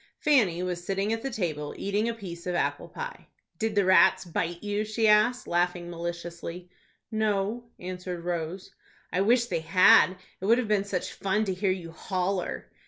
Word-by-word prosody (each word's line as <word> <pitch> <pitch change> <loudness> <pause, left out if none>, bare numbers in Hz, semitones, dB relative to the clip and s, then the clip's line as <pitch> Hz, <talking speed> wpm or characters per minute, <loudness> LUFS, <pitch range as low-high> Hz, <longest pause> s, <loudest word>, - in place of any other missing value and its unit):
Fanny 210 - +3
was 180 -1 -3
sitting 195 +3 -1
at 225 - -3
the 270 - -3
table, 160 - -3
eating 205 +3 0
a - - -1
piece 180 -5 -8
of 180 - -1
apple - - -1
pie. 485 0 -7 0.3
"Did 220 -2 -1
the 200 -2 +3
rats 185 0 +5
bite 170 +1 -3
you?" 205 0 -1
she 215 +1 0
asked, 215 +4 +4
laughing 175 0 0
maliciously. 170 +1 -6 0.4
"No," 215 +1 0
answered 180 -1 -6
Rose. 175 +1 -3 0.4
"I 185 - +2
wish 235 +4 +4
they 175 -8 -2
had. 185 +2 +5 0.2
It - - -3
would 230 +2 +6
have 250 -3 -1
been 205 -2 +1
such 195 -3 -3
fun 210 +2 0
to 190 - -1
hear 190 +2 0
you 180 -3 -3
holler." 185 +2 -3
190 Hz, 175 wpm, -27 LUFS, 175-215 Hz, 0.4 s, would